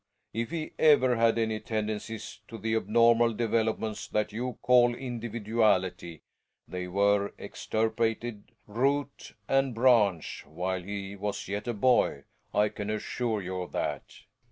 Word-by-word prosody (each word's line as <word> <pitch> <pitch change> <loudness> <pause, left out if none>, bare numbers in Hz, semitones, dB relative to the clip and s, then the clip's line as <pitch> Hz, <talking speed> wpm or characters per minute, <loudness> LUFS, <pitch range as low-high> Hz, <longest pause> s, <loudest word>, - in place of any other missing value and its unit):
If 115 +1 -2
he 160 -1 -4
ever 135 -5 +5
had 115 0 +3
any 110 -1 0
tendencies 110 0 -4
to 115 - -8
the 110 +1 -2
abnormal 115 +2 +4
developments 110 -1 -1
that 105 0 -1
you 120 0 -3
call 120 -1 +5
individuality, 110 - -1 0.4
they 90 0 -5
were 100 +2 +2
extirpated, 115 0 -2
root 140 +6 -1
and 135 -2 +1
branch, 110 - +3
while 90 +4 -3
he 100 +1 -6
was 100 +1 -4
yet 105 +4 -4
a 120 - -1
boy; 125 +4 +2 0.3
I 105 +1 +3
can 105 0 -6
assure 110 0 -2
you 90 0 -4
of 90 - -8
that. - - -4
110 Hz, 130 wpm, -29 LUFS, 100-120 Hz, 0.4 s, ever